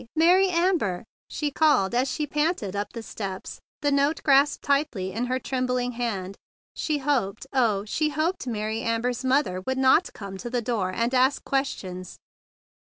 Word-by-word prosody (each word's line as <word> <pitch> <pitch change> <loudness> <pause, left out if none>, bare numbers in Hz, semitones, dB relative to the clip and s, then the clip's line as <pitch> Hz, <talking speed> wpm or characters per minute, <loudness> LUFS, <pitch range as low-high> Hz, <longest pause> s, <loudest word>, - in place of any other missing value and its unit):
Mary 360 +4 +5
Amber!" 335 - +1 0.2
she 295 -1 -3
called 280 -10 +3
as 255 +2 +1
she 300 +4 -2
panted 295 - -1
up 205 +1 -3
the 230 - -7
steps, 195 -4 -6 0.2
the 290 - +1
note 285 +3 +1
grasped 280 +1 +4
tightly 280 -10 0
in 235 +4 -1
her 255 +1 0
trembling 250 -1 -1
hand. 200 -6 -4 0.3
She 305 -2 -1
hoped, 265 -7 -1
oh, 220 -6 +2
she 305 +8 0
hoped 310 0 -1
Mary 220 -1 -2
Amber's 230 +2 -1
mother 260 -9 +1
would 260 0 0
not 265 +7 +4
come 195 -2 -8
to 240 - -5
the 245 0 0
door 220 -6 -1
and 230 +6 -1
ask 260 +2 +3
questions. 190 -10 -3
250 Hz, 165 wpm, -25 LUFS, 210-290 Hz, 0.3 s, Mary